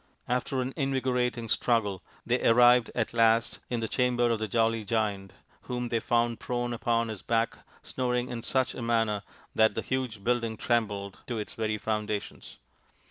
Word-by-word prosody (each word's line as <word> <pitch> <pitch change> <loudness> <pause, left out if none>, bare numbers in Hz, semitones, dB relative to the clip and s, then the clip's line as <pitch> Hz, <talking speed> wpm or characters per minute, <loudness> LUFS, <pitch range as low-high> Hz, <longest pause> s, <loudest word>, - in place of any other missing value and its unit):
After 125 +1 0
an 130 +1 -3
invigorating 125 -4 0
struggle 105 -5 +1 0.2
they 125 +2 0
arrived 120 0 +6
at 115 -2 -1
last 115 0 +3
in 120 -2 -1
the 110 - -1
chamber 120 0 +2
of 115 - 0
the 110 - -2
jolly 115 +1 +1
Giant, 105 -3 -1 0.4
whom 125 -1 -2
they 115 - +1
found 120 0 +1
prone 120 -1 -2
upon 115 0 0
his 110 -3 -6
back 115 0 0 0.2
snoring 125 -1 -1
in 120 -2 -4
such 130 +2 0
a - - -7
manner 115 -3 +1 0.3
that 110 -1 +4
the - - -2
huge 125 -6 -3
building 115 -1 0
trembled 100 -5 -1
to 120 -3 -3
its 105 - -5
very 110 -1 -1
foundations. 105 -1 -4
115 Hz, 165 wpm, -28 LUFS, 110-125 Hz, 0.4 s, arrived